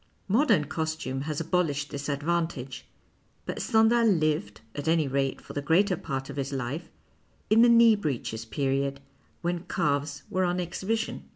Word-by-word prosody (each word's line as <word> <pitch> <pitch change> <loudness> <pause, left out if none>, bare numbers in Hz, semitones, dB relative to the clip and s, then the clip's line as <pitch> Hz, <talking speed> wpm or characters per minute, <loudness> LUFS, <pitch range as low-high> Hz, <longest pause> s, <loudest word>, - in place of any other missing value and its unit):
Modern 210 - +3
costume 155 -4 -3
has 150 - -2
abolished 160 -4 0
this 145 +1 -4
advantage, 145 -3 -2 0.6
but - - -4
Stendhal 225 +1 +4
lived, 155 - +1
at 145 +1 -5
any 160 -2 +3
rate 135 0 -1
for - - -11
the 145 - -2
greater 180 +6 +3
part 135 -4 -4
of 140 - -8
his 140 0 -2
life, 135 +4 -4 0.6
in 220 +1 +6
the 240 - +7
knee 230 -1 +7
breeches 130 - -3
period, 135 +4 -1 0.4
when 175 0 -2
calves 145 -1 -1
were 185 0 0
on 180 0 0
exhibition. 190 +6 -3
155 Hz, 155 wpm, -27 LUFS, 140-180 Hz, 0.6 s, the